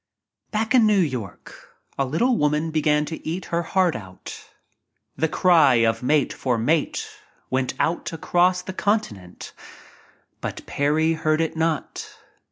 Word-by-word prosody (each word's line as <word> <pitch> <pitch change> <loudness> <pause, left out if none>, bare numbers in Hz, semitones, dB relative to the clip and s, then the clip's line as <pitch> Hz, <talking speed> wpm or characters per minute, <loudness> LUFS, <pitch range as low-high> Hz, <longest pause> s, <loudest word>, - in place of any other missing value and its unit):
Back 220 +2 -1
in 240 -4 +5
New 210 -1 +3
York 125 - -5 0.2
a 135 - 0
little 235 - +1
woman 150 -1 0
began 150 -1 +1
to 160 +2 -7
eat 170 +4 -4
her 170 - +2
heart 180 0 +1
out. 95 -4 -10 0.7
The 160 +4 0
cry 160 -6 +4
of 115 -1 +2
mate 145 +3 +1
for 125 -3 -1
mate 150 +8 0 0.4
went 130 0 -1
out 170 - -1
across 180 +3 +1
the 190 - -6
continent, 150 - -3 0.9
but - - -6
Parry 155 +3 +1
heard 155 -1 0
it 165 -1 -1
not. 160 -1 -3
155 Hz, 140 wpm, -23 LUFS, 135-175 Hz, 0.9 s, in